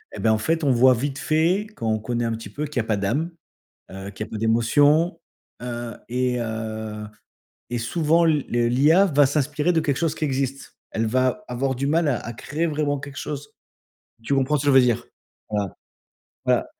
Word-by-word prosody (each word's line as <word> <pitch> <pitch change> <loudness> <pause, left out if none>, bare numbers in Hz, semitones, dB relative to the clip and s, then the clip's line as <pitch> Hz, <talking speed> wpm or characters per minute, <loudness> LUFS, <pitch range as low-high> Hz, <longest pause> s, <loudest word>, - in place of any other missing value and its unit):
et - - -7
ben, 110 - +3
en 110 - +3
fait, 160 +8 0
on 140 - +4
voit 130 +1 +6
vite 135 +3 -3
fait, 165 +8 +1
quand 115 - -4
on 110 0 +1
connaît 120 +2 -2
un 115 - -1
petit 110 -3 -7
peu, 150 +8 -4
qu'il 145 -3 -3
y - - +3
a - - -3
pas 110 -1 0
d'âme, 135 - -1 0.6
heu, 95 +1 -7
qu'il 110 - -5
y - - -13
a - - -20
peu 110 - -5
d'émotion, 145 +10 +3 0.4
heu 120 -1 -5 0.2
et 125 0 0
heu 110 -1 -4 0.7
et 120 - -1
souvent 165 +7 +2
l 150 -4 +2
le 120 0 +2
l'IA 155 +10 +5
va 145 -4 +4
s'inspirer 150 +4 0
de 165 - +2
quelque 140 -4 0
chose 165 -2 0
qui 155 - -3
existe. 135 0 -3
Elle 115 0 -1
va 130 - +1
avoir 130 +2 -1
du 140 +2 -1
mal 160 +2 +2
à 130 - +1
à 120 - -6
créer 155 +8 -2
vraiment 150 -2 -1
quelque 140 +1 -9
chose. 145 -1 -6 0.7
Tu 140 - -1
comprends 135 +2 +2
ce 135 - -2
que - - 0
je 140 - +5
veux - - +9
dire? 120 -3 +1 0.4
Voilà, 105 -2 0 0.8
voilà, - - +2
135 Hz, 215 wpm, -23 LUFS, 115-150 Hz, 0.8 s, veux